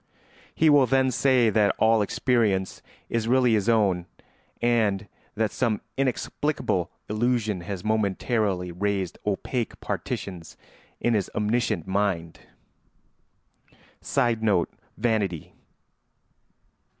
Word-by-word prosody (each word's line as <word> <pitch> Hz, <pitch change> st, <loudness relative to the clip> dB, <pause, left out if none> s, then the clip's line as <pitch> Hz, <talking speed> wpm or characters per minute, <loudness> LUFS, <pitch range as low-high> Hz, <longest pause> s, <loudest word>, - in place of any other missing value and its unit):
He 160 Hz, -, +3 dB
will 145 Hz, -3 st, +6 dB
then 130 Hz, +1 st, +3 dB
say 125 Hz, -3 st, +3 dB
that 105 Hz, -2 st, +3 dB
all 110 Hz, 0 st, +4 dB
experience 105 Hz, -4 st, 0 dB, 0.3 s
is 115 Hz, -1 st, -1 dB
really 125 Hz, -1 st, +4 dB
his 110 Hz, +1 st, +1 dB
own 95 Hz, -6 st, +2 dB, 0.5 s
and 110 Hz, -4 st, +1 dB, 0.3 s
that 110 Hz, -2 st, 0 dB
some 115 Hz, -5 st, 0 dB, 0.2 s
inexplicable 135 Hz, -, -1 dB, 0.2 s
illusion 110 Hz, -3 st, 0 dB
has 90 Hz, +1 st, -6 dB
momentarily 105 Hz, -3 st, 0 dB
raised 95 Hz, 0 st, -2 dB
opaque 115 Hz, +4 st, -2 dB
partitions 90 Hz, -4 st, -5 dB, 0.4 s
in 120 Hz, -, +1 dB
his 100 Hz, -4 st, 0 dB
omniscient 105 Hz, -4 st, 0 dB
mind. 95 Hz, -4 st, -1 dB, 1.6 s
[Sidenote: 110 Hz, -7 st, +1 dB, 0.2 s
Vanity. 105 Hz, -9 st, -1 dB
110 Hz, 95 wpm, -25 LUFS, 95-120 Hz, 1.6 s, will